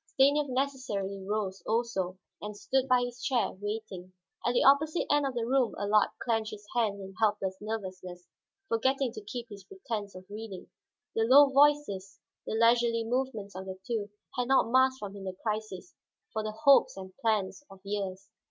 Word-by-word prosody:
Stanief 285 Hz, +1 st, +4 dB
necessarily 255 Hz, -8 st, -2 dB
rose 195 Hz, -2 st, -2 dB
also, 215 Hz, -5 st, -1 dB, 0.2 s
and 210 Hz, 0 st, -6 dB
stood 265 Hz, +5 st, 0 dB
by 250 Hz, -1 st, +4 dB
his 245 Hz, 0 st, -5 dB
chair, 260 Hz, -5 st, +1 dB
waiting. 205 Hz, -2 st, -6 dB, 0.3 s
At 240 Hz, -, +1 dB
the 245 Hz, -, +3 dB
opposite 305 Hz, +4 st, +4 dB
end 290 Hz, -1 st, +3 dB
of 265 Hz, -, -5 dB
the 235 Hz, -1 st, -1 dB
room 255 Hz, -2 st, +1 dB
Allard 205 Hz, +1 st, +3 dB
clenched 225 Hz, -3 st, 0 dB
his 210 Hz, -1 st, -10 dB
hands 215 Hz, -4 st, +1 dB
in 195 Hz, 0 st, -9 dB
helpless 205 Hz, -3 st, +1 dB
nervousness, 185 Hz, -4 st, -6 dB, 0.4 s
forgetting 260 Hz, +3 st, +1 dB
to 215 Hz, -, -8 dB
keep 240 Hz, +3 st, -6 dB
his 200 Hz, -2 st, -10 dB
pretense 225 Hz, -, -6 dB
of 185 Hz, 0 st, -10 dB
reading. 210 Hz, -2 st, -8 dB, 0.4 s
The 225 Hz, -, +2 dB
low 275 Hz, +4 st, +8 dB
voices, 275 Hz, -9 st, +2 dB, 0.3 s
the -, -, -2 dB
leisurely 230 Hz, 0 st, +3 dB
movements 225 Hz, -4 st, -2 dB
of 190 Hz, +1 st, -7 dB
the 190 Hz, 0 st, -6 dB
two, 225 Hz, -4 st, -2 dB, 0.3 s
had 250 Hz, -1 st, -1 dB
not 265 Hz, -3 st, +3 dB
masked 260 Hz, +1 st, +4 dB
from 205 Hz, -4 st, -7 dB
him 195 Hz, -1 st, -8 dB
the 185 Hz, -, -4 dB
crisis 215 Hz, -, -5 dB, 0.4 s
for 220 Hz, -, -1 dB
the 215 Hz, 0 st, -3 dB
hopes 275 Hz, -1 st, +5 dB
and 190 Hz, -1 st, -9 dB
plans 215 Hz, +2 st, 0 dB
of 195 Hz, -, -14 dB
years. 195 Hz, -1 st, -4 dB
220 Hz, 175 wpm, -30 LUFS, 200-255 Hz, 0.4 s, low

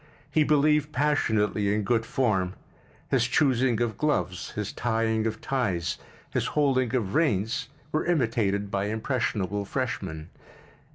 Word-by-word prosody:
He 155 Hz, -, +4 dB
believed 150 Hz, 0 st, +3 dB
passionately 110 Hz, -8 st, +1 dB
in 105 Hz, 0 st, +1 dB
good 115 Hz, +2 st, +1 dB
form—his 110 Hz, +2 st, -2 dB
choosing 130 Hz, -4 st, +2 dB
of 115 Hz, -2 st, -1 dB
gloves, 150 Hz, -, 0 dB
his 105 Hz, -1 st, -4 dB
tying 115 Hz, -1 st, 0 dB
of 110 Hz, -, -4 dB
ties, 95 Hz, -, -1 dB, 0.3 s
his -, -, 0 dB
holding 130 Hz, -4 st, +2 dB
of 105 Hz, -6 st, -1 dB
reins 115 Hz, -, +1 dB, 0.2 s
were 155 Hz, +2 st, 0 dB
imitated 110 Hz, -, +1 dB
by 100 Hz, 0 st, 0 dB
impressionable 105 Hz, -3 st, -1 dB
freshmen. 95 Hz, -, -4 dB
115 Hz, 120 wpm, -27 LUFS, 100-135 Hz, 0.3 s, He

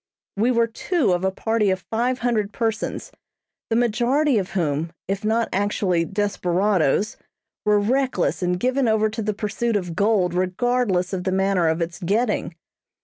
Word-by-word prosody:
We 220 Hz, +5 st, +2 dB
were 235 Hz, -2 st, +3 dB
two 255 Hz, -, 0 dB
of 175 Hz, +1 st, -1 dB
a 190 Hz, -, +3 dB
party 220 Hz, +2 st, 0 dB
of 185 Hz, -1 st, -2 dB
five 245 Hz, +3 st, 0 dB
hundred 215 Hz, -4 st, 0 dB
persons, 225 Hz, -2 st, -3 dB, 0.6 s
the 225 Hz, -, +1 dB
majority 245 Hz, +3 st, +2 dB
of 190 Hz, -, -5 dB
whom, 165 Hz, -2 st, -1 dB
if 195 Hz, +1 st, -2 dB
not 225 Hz, +1 st, +1 dB
actually 190 Hz, -3 st, +1 dB
desperadoes, 195 Hz, -2 st, 0 dB, 0.5 s
were 210 Hz, 0 st, +4 dB
reckless 255 Hz, +4 st, 0 dB
and 180 Hz, 0 st, 0 dB
given 255 Hz, +2 st, +1 dB
over 220 Hz, -1 st, +2 dB
to 220 Hz, +1 st, -5 dB
the 210 Hz, -1 st, -2 dB
pursuit 215 Hz, +2 st, -2 dB
of 175 Hz, -5 st, -2 dB
gold 200 Hz, -4 st, +2 dB
regardless 185 Hz, +1 st, 0 dB
of 180 Hz, -1 st, -2 dB
the 185 Hz, -, -1 dB
manner 190 Hz, -2 st, +2 dB
of 160 Hz, +1 st, +1 dB
its 170 Hz, +1 st, -6 dB
getting. 205 Hz, -1 st, 0 dB
205 Hz, 160 wpm, -23 LUFS, 185-230 Hz, 0.6 s, were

